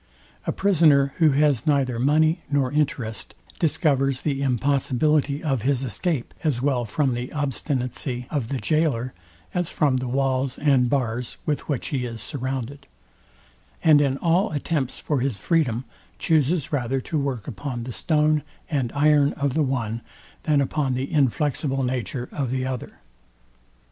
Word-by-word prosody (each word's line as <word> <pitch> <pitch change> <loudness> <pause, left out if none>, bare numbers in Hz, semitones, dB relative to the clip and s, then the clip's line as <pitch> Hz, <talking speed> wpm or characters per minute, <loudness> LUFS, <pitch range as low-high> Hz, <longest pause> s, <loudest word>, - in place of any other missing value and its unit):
A - - +2
prisoner, 155 -8 +4
who 160 -2 +5
has 145 -3 +2
neither 135 -5 +2
money 155 +6 +3
nor 140 -3 +1
interest, 130 -7 -2 0.2
discovers 140 -5 +1
the 140 -3 -1
impossibility 140 +2 +1
of 135 -7 0
his 135 +2 +1
escape, 135 +1 -2
as 150 -7 +1
well 130 -2 +1
from 130 +4 0
the 120 +1 -4
obstinacy 130 -3 -2
of 140 -7 -1
the 135 - -2
goaler, 135 -5 0 0.4
as 180 -2 0
from 140 -4 +2
the 125 0 -3
walls 135 0 0
and 135 -4 +3
bars 125 -3 -1
with 150 0 -2
which 140 -5 -1
he 130 -4 -1
is 115 -1 -6
surrounded; 135 +2 -5 1.0
and 150 -2 +6
in 135 -2 +1
all 175 +7 +2
attempts 145 -2 -1
for 145 -3 -1
his 130 -4 -1
freedom 130 - 0 0.3
chuses 155 0 +1
rather 135 -1 0
to 155 +4 -2
work 135 -7 -3
upon 120 +2 -5
the 125 0 -6
stone 155 0 +2 0.3
and 130 -6 0
iron 145 -1 +4
of 140 -2 -1
the 160 - +1
one, 120 -5 -1 0.5
than 145 -2 +4
upon 135 -1 0
the 135 +6 -3
inflexible 140 -1 +1
nature 125 0 -2
of 135 -4 -2
the 130 +1 -1
other. 130 -2 -5
135 Hz, 150 wpm, -24 LUFS, 125-150 Hz, 1.0 s, and